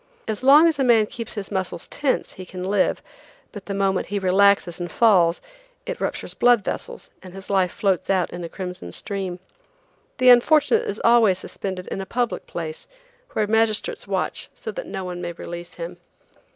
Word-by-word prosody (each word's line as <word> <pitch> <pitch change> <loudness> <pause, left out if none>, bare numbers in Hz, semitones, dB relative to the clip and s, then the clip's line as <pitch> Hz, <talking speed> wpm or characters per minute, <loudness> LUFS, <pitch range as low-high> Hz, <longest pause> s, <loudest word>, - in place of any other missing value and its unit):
As 220 0 -3
long 290 +5 +7
as 315 -4 0
a - - +3
man 230 -4 +5
keeps 230 +2 -7
his 205 -1 -5
muscles 185 -3 -3
tense 285 -3 -1
he 185 - -9
can 180 0 -8
live, 195 +1 +1 0.5
but 205 -3 -10
the 200 - -3
moment 195 -1 0
he 205 - -2
relaxes 190 -2 +3
and 175 0 -5
falls, 180 -7 +4 0.4
it - - -5
ruptures - - -3
blood 240 -4 +4
vessels 480 - -6
and 185 0 -12
his 195 0 -8
life 190 -2 +2
floats 195 -4 0
out 190 -3 +1
on 175 0 -6
a 170 - -5
crimson 180 - -7
stream. 190 -3 -4 0.8
The 255 -1 +5
unfortunate 285 +5 +5
is 205 - -4
always 230 -5 +5
suspended 185 -1 -6
in 195 - -4
a 190 - -7
public 245 -1 -2
place, 480 +1 -6 0.5
where 215 - +1
magistrates 220 0 0
watch - - -2
so 460 - -6
that - - -7
no 190 - -5
one 180 -1 -5
may 175 -1 -4
release 175 +1 -8
him. 175 +1 -7
200 Hz, 185 wpm, -23 LUFS, 180-235 Hz, 0.8 s, long